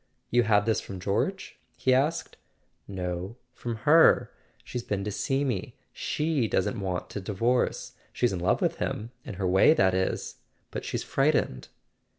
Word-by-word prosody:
"You 120 Hz, -, +5 dB
had 105 Hz, -3 st, +3 dB
this 110 Hz, -1 st, +1 dB
from 95 Hz, -, -8 dB
George?" 105 Hz, -, -2 dB, 0.2 s
he 130 Hz, -, +2 dB
asked. 140 Hz, +5 st, 0 dB, 0.5 s
"No; 90 Hz, +2 st, -4 dB, 0.2 s
from 120 Hz, -1 st, -4 dB
her. 160 Hz, +2 st, +6 dB, 0.3 s
She's 125 Hz, -, -5 dB
been 100 Hz, -4 st, -3 dB
to 105 Hz, -, -3 dB
see 135 Hz, +7 st, 0 dB
me. 120 Hz, -8 st, -3 dB, 0.2 s
She 150 Hz, -6 st, 0 dB
doesn't 105 Hz, +1 st, 0 dB
want 90 Hz, -2 st, -3 dB
to 100 Hz, -, -4 dB
divorce. 115 Hz, +6 st, 0 dB, 0.2 s
She's 120 Hz, -5 st, +1 dB
in 90 Hz, -, -2 dB
love 90 Hz, -, +1 dB
with -, -, 0 dB
him; 110 Hz, +3 st, -3 dB
in -, -, -6 dB
her 95 Hz, 0 st, -3 dB
way, 95 Hz, -, +5 dB
that 95 Hz, -7 st, +3 dB
is; 95 Hz, 0 st, -1 dB, 0.3 s
but -, -, -5 dB
she's -, -, -3 dB
frightened." 65 Hz, -, +1 dB
105 Hz, 165 wpm, -27 LUFS, 95-125 Hz, 0.5 s, her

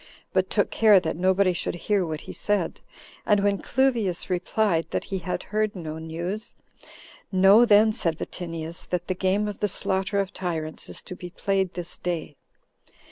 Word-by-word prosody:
but -, -, +2 dB
took -, -, +1 dB
care 215 Hz, -3 st, +6 dB
that -, -, -3 dB
nobody 185 Hz, +2 st, +3 dB
should 175 Hz, -, -2 dB
hear 200 Hz, +2 st, 0 dB
what 160 Hz, -2 st, -4 dB
he -, -, -9 dB
said; 205 Hz, -1 st, -1 dB, 0.4 s
and 205 Hz, -1 st, +3 dB
when 200 Hz, -1 st, +2 dB
Cluvius 235 Hz, -10 st, 0 dB
replied, 180 Hz, -1 st, +1 dB
that -, -, -2 dB
he 195 Hz, -, -4 dB
had 180 Hz, +1 st, -3 dB
heard 215 Hz, -1 st, +1 dB
no 160 Hz, -3 st, -6 dB
news, 170 Hz, +7 st, -5 dB, 0.8 s
"Know 195 Hz, +5 st, +7 dB
then," 215 Hz, 0 st, +5 dB
said 165 Hz, -6 st, -1 dB
Vatinius, 165 Hz, -2 st, -6 dB
"that 175 Hz, -1 st, -2 dB
the 185 Hz, -, -1 dB
game 190 Hz, +3 st, +1 dB
of 205 Hz, -, -5 dB
the 210 Hz, -, +1 dB
slaughter 190 Hz, +1 st, 0 dB
of 195 Hz, -1 st, -2 dB
tyrants 160 Hz, -4 st, -3 dB
is -, -, -4 dB
to 180 Hz, -, -8 dB
be 180 Hz, 0 st, -8 dB
played 190 Hz, 0 st, -1 dB
this 175 Hz, -1 st, -5 dB
day." 170 Hz, -4 st, -3 dB
185 Hz, 175 wpm, -25 LUFS, 175-205 Hz, 0.8 s, Know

